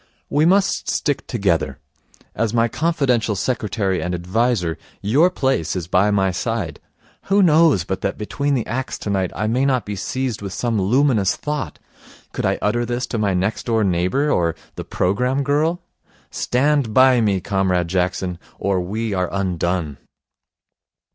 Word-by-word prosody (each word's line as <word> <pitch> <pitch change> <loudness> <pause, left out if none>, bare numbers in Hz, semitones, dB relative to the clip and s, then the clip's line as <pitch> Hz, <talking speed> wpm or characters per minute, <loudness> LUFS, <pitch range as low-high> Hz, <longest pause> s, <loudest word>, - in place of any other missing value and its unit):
'We 150 +2 +3
must 195 +2 +2
stick 145 -2 -1
together. 85 - 0 0.6
As 115 +1 -1
my 115 0 +3
confidential 130 -7 0
secretary 100 -4 -1
and 90 +2 -2
adviser, 90 -1 0 0.2
your 140 - +3
place 130 - -1
is 90 -3 -3
by 95 +4 +3
my 95 -2 +2
side. 90 - -3 0.5
Who 200 +1 +3
knows 160 - +4
but 95 +2 -4
that 100 - -2
between 140 +7 -1
the 120 - -1
acts 130 +3 -3
tonight 95 -3 -1
I 110 - -1
may 120 +5 +1
not 130 -3 +1
be 105 - -4
seized 125 +3 -3
with 100 -2 -5
some 115 -1 -1
luminous 110 -2 +2
thought? 150 -2 -4 0.6
Could - - -1
I - - +1
utter 120 +3 +1
this 120 +2 -2
to 115 - -2
my 100 -3 +1
next 95 +7 -1
door 115 -2 +2
neighbour 95 +11 +1
or 85 - +1 0.2
the - - -6
programme 125 +9 0
girl? 155 +5 0 0.5
Stand 135 -3 +1
by 130 -2 +6
me, 100 -3 +2
Comrade 90 -2 0
Jackson, 90 0 -1 0.2
or 95 -1 0
we 105 +4 -3
are 90 -2 0
undone.' 90 -5 -2
110 Hz, 155 wpm, -20 LUFS, 95-130 Hz, 0.6 s, by